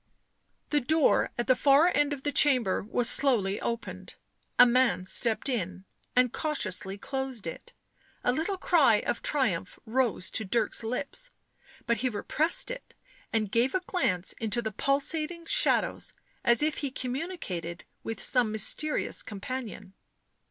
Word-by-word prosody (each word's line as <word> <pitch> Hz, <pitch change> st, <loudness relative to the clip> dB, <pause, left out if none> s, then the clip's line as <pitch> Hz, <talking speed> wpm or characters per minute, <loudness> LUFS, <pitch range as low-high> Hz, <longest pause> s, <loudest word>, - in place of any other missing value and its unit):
The 295 Hz, -1 st, +2 dB
door 310 Hz, +4 st, +2 dB
at 240 Hz, -, -1 dB
the 255 Hz, -, +4 dB
far 280 Hz, +5 st, +5 dB
end 290 Hz, 0 st, +2 dB
of 280 Hz, -2 st, -5 dB
the 290 Hz, -, -1 dB
chamber 255 Hz, -10 st, +3 dB
was 235 Hz, +3 st, 0 dB
slowly 215 Hz, -8 st, +3 dB
opened; 235 Hz, 0 st, -5 dB, 0.4 s
a 245 Hz, -, +9 dB
man 250 Hz, -6 st, +2 dB
stepped 225 Hz, +6 st, +1 dB
in 190 Hz, -7 st, -3 dB, 0.3 s
and 250 Hz, -1 st, +3 dB
cautiously 195 Hz, -, -3 dB
closed 265 Hz, -2 st, -5 dB
it; 485 Hz, -, -8 dB, 0.5 s
a 245 Hz, -, +3 dB
little 335 Hz, +8 st, -2 dB
cry 315 Hz, -, +4 dB
of -, -, -3 dB
triumph 215 Hz, -, -1 dB
rose 230 Hz, -5 st, -1 dB
to 220 Hz, -, -1 dB
Dirk's 220 Hz, +2 st, 0 dB
lips, 275 Hz, -, -4 dB, 0.6 s
but 235 Hz, -, +1 dB
he 255 Hz, +3 st, 0 dB
repressed 315 Hz, -, +1 dB
it -, -, -9 dB, 0.4 s
and 215 Hz, -3 st, -1 dB
gave 235 Hz, +7 st, +1 dB
a -, -, +3 dB
glance 245 Hz, -, -1 dB
into 225 Hz, +1 st, +1 dB
the 220 Hz, -2 st, -3 dB
pulsating 305 Hz, -, -1 dB
shadows -, -, +2 dB, 0.3 s
as 235 Hz, +4 st, +4 dB
if 305 Hz, 0 st, 0 dB
he 285 Hz, -, -2 dB
communicated 250 Hz, -, -5 dB, 0.2 s
with 225 Hz, -3 st, -5 dB
some 245 Hz, -4 st, +3 dB
mysterious 220 Hz, +8 st, 0 dB
companion. 210 Hz, -2 st, -7 dB
250 Hz, 145 wpm, -28 LUFS, 215-290 Hz, 0.6 s, a